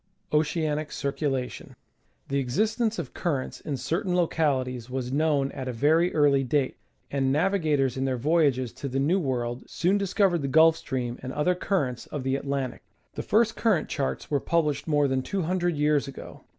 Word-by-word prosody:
Oceanic 155 0 0
Cieculation. 140 -3 -3 0.5
The 140 0 0
existence 215 - 0
of - - -5
currents 140 -7 -2
in 145 -3 -4
certain 175 - -1
localities 130 -8 0
was 130 -1 -3
known 145 -1 +1
at 130 -1 -6
a - - -1
very 155 +8 +3
early 145 -3 +4
date, 135 +1 0 0.3
and 135 -1 +1
navigators 150 -5 +1
in 135 - 0
their 130 -1 0
voyages 140 -3 +2
to 140 - -6
the 135 +1 -1
new 165 +8 +2
world 125 -5 -2
soon 190 +4 +1
discovered 195 -3 +2
the 140 - -2
Gulf 160 +3 +6
Stream 125 -6 -4
and 130 - -5
other 150 +6 +1
currents 160 -10 -2
of 145 -3 -5
the 130 0 0
Atlan 140 -1 -1
tic. - - -17 0.3
The - - -4
first 225 +1 +2
current 205 -9 +1
charts 140 +1 -3
were 145 - +2
published 150 -2 0
more 145 -2 +3
than 130 -1 0
two 195 +6 -2
hun 185 +3 0
dred 175 -3 0
years 150 -1 +2
ago. 135 - -10
145 Hz, 180 wpm, -26 LUFS, 130-165 Hz, 0.5 s, Gulf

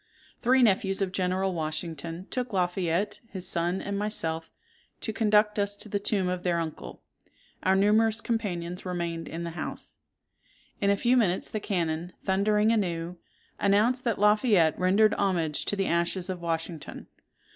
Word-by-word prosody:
"Three 255 +1 +4
nephews 195 -3 +2
of 190 - -2
General 185 0 0
Washington 165 +1 -4
took 250 -3 -3
Lafayette, 180 +1 0
his 185 -2 -3
son, 175 +1 +1
and 200 0 -3
myself, 165 -6 -2 0.5
to 220 - -3
conduct 210 -1 +3
us 200 0 0
to - - -3
the 205 - -1
tomb 200 -2 0
of 180 0 -2
their 175 -1 0
uncle: 160 -2 -6 0.6
our 190 +1 +3
numerous 215 +3 +3
companions 180 -7 -3
remained 170 -2 -3
in 165 +1 -5
the 170 - -4
house. 170 - -6 0.8
In 200 - +2
a 200 - +3
few 240 +4 +3
minutes 195 -7 +1
the 215 - -2
cannon, 170 -3 -2
thundering 210 +3 +2
anew, 175 -5 -1 0.4
announced 215 +6 +3
that 230 -3 +1
Lafayette 210 - +4
rendered 200 +4 +4
homage 170 -6 0
to - - 0
the 195 -1 0
ashes 175 +2 0
of 180 -2 -6
Washington. 165 -1 -4
190 Hz, 155 wpm, -28 LUFS, 170-210 Hz, 0.8 s, Three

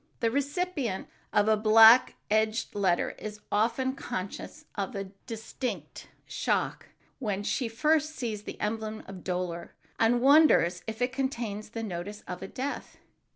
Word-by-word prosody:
The 230 -1 +1
recipient 285 - -1 0.2
of 205 - +3
a 220 - +5
black 220 +3 +7 0.2
edged 220 +1 +1
letter 190 -4 +1
is 210 0 -7
often 235 +5 +1
conscious 235 +6 -6
of 200 -1 -3
a 195 -1 -5 0.2
distinct 220 - -5 0.2
shock - - -1 0.3
when 205 -5 -2
she 245 +4 -1
first 305 +6 +1
sees 220 -5 -3
the - - -8
emblem 215 0 -3
of 190 -2 -10
dolor, 180 -2 -3 0.2
and 230 +2 +4
wonders 265 - +5
if 220 +2 -2
it 250 +1 -1
contains 235 -6 -3
the 225 +1 -5
notice 200 +1 -5
of 180 - -6
a - - -5
death. 275 +3 -5
220 Hz, 145 wpm, -29 LUFS, 205-255 Hz, 0.3 s, black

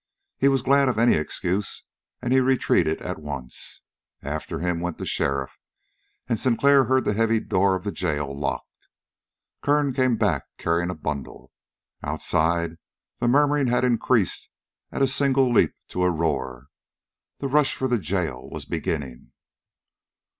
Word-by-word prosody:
He - - +4
was 135 -2 +2
glad 140 0 +4
of 120 - -1
any 120 +2 +5
excuse, 90 +5 -2 0.4
and 125 - +1
he 130 - +6
retreated 130 -11 +2
at 90 -3 -5
once. 70 -4 -6 0.4
After 75 +2 -4
him 90 -1 -1
went 90 0 -3
the - - -5
sheriff, 70 -1 -1 0.7
and 115 -3 0
Sinclair 135 +2 +4
heard 130 +2 +2
the - - +1
heavy 115 +1 +2
door 95 -2 +2
of 95 - -5
the 100 - -2
jail 75 -7 -2
locked. 70 0 -5 0.7
Kern 145 -1 +2
came 130 -3 +2
back, 95 - +1
carrying 85 +1 0
a 90 - -3
bundle. 75 -3 -6 0.5
Outside, 85 +1 0 0.4
the 120 - 0
murmuring 145 +1 +3
had 125 +1 +2
increased 120 -4 +1 0.4
at - - 0
a - - +5
single 135 -1 +3
leap 120 - +3
to 90 - -1
a 90 - +4
roar. 70 -6 -2 0.7
The 140 - -3
rush 145 +1 +2
for 130 - -1
the 120 -2 +1
jail 85 -6 -3
was - - -6
beginning. 65 -6 -4
100 Hz, 150 wpm, -24 LUFS, 80-130 Hz, 0.7 s, he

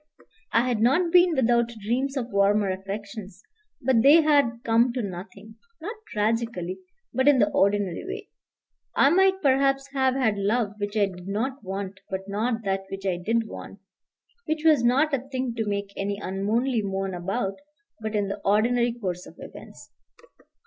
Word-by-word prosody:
I 235 +2 +3
had 235 -4 0
not 330 +9 +3
been 355 -1 +5
without 235 -2 +2
dreams 255 +7 -1
of 245 -2 -3
warmer 200 0 +3
affections, 195 +1 -7 0.4
but 245 -2 +3
they 300 +6 +7
had 280 -6 +2
come 230 +2 +3
to 250 -2 -2
nothing 200 +3 -8 0.2
not 415 +8 -6
tragically, 215 -4 -2 0.3
but 260 +1 +1
in 290 -2 +6
the - - +3
ordinary 200 -2 +1
way. 405 +2 -6 0.7
I 275 - +5
might 380 +1 +3
perhaps 275 0 +2
have 265 -1 +2
had 220 -6 +1
love 210 +1 0
which 205 +1 -3
I 205 - +4
did 180 -1 -9
not 255 +7 -3
want 195 0 -5
but 190 0 -3
not 225 +3 -1
that 195 -1 -1
which 195 0 -7
I 185 -2 0
did 225 +5 0
want, 200 - -9 0.7
which 310 0 -1
was 305 -6 +5
not 275 +6 +3
a 275 - +2
thing 260 -2 -4
to 225 -2 -3
make 200 -1 -3
any 200 0 -2
unmanly 215 +6 -1
moan 195 -1 -3
about, 195 +4 -3 0.4
but 220 0 -4
in 205 -1 +1
the 200 +1 -5
ordinary 235 +4 +2
course 185 -6 -5
of - - -14
events. 125 0 -12
225 Hz, 170 wpm, -25 LUFS, 200-260 Hz, 0.7 s, they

